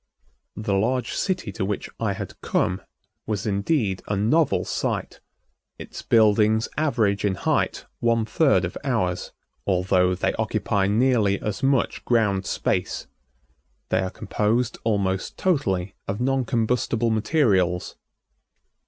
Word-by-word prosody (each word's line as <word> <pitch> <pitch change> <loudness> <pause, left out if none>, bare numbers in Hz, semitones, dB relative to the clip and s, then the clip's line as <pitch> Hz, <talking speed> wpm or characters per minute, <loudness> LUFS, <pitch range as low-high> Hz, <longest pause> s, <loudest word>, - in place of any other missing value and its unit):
The 105 -1 -2
large 120 +5 0
city 185 - -1
to 95 - -4
which 100 +1 -2
I - - 0
had - - -8
come 90 +2 0 0.5
was 105 -2 -2
indeed 100 - 0
a 105 - 0
novel 125 +10 +2
sight. - - -3 0.6
Its - - -8
buildings 110 0 +3
average 115 -10 +1
in 100 -2 +1
height - - 0
one 115 -1 +2
third 110 - +3
of 90 - -6
ours, 100 -10 -1 0.4
although 90 -1 +2
they 90 - 0
occupy 95 -1 0
nearly 110 -2 +2
as 105 -2 -4
much 135 -2 +1
ground 105 -5 +1
space. - - -1 0.8
They - - +2
are 95 - -1
composed 110 +6 -1
almost 100 -4 -1
totally 100 - 0
of 100 +1 -3
non 135 +1 +1
combustible 115 -1 0
materials. 105 - +1
105 Hz, 125 wpm, -24 LUFS, 95-120 Hz, 0.8 s, buildings